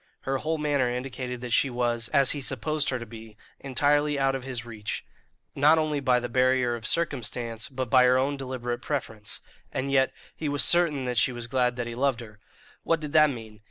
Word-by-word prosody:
Her 135 0 -2
whole 160 +3 -1
manner 145 -4 +1
indicated 125 0 -4
that 125 -2 -4
she 140 - +4
was, 120 -1 -1
as 135 -2 +4
he 145 - -2
supposed 155 +2 0
her 130 - -1
to 120 - -7
be, 110 -1 -12 0.2
entirely 145 +2 +1
out 135 -1 +2
of 135 -1 -4
his 125 -3 -5
reach, 110 -3 -5 0.5
not 150 +3 +5
only 155 -2 0
by 130 -3 +3
the 120 - -4
barrier 130 0 +2
of 115 -2 -4
circumstance, 120 -8 -1
but 130 -3 -4
by 130 -1 +6
her 125 0 +5
own 135 +2 +1
deliberate 125 -3 -4
preference; 110 -8 -4 0.3
and 135 +1 -2
yet 135 -1 +3 0.2
he 155 - -3
was 145 0 +2
certain 170 -6 +3
that 125 -2 0
she 130 - +2
was 120 -1 -6
glad 125 0 +1
that 120 -1 -3
he 120 - -5
loved 130 0 0
her. 105 -2 -12 0.4
What 165 - +1
did 150 -1 -6
that 155 -1 +6
mean? 110 -5 -8
130 Hz, 210 wpm, -27 LUFS, 120-140 Hz, 0.5 s, by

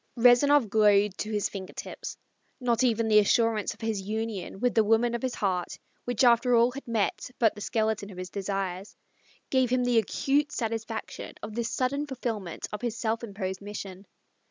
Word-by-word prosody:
Rezanov 250 +2 +5
glowed 205 -1 +4
to 215 - -3
his 210 -1 0
finger 190 -2 -8
tips. - - -7 0.4
Not 245 -1 +1
even 230 -2 +2
the 215 -1 +6
assurance 220 0 +2
of - - -22
his 220 -3 -1
union 210 -2 -4
with 245 +2 +1
the 220 - +4
woman 225 +3 +3
of 235 - -2
his 255 -1 -2
heart, 185 -3 -1 0.3
which 245 +1 0
after 240 0 +5
all 235 +1 +4
had 275 +1 -9
met 225 +1 -1
but 225 -3 +3
the 210 - -10
skeleton 220 -2 -1
of 190 - -11
his 185 0 -6
desires, 195 -1 -3 0.6
gave 260 -2 +3
him 250 0 +2
the 245 -2 +4
acute 285 +7 0
satisfaction 225 -2 -4
of 210 0 -6
this 235 +1 -2
sudden 280 +3 -1
fulfilment 225 - -4
of 210 - -4
his 235 -2 -2
self 230 0 -1
imposed 195 -3 -4
mission. 200 -1 -8
225 Hz, 180 wpm, -28 LUFS, 205-245 Hz, 0.6 s, the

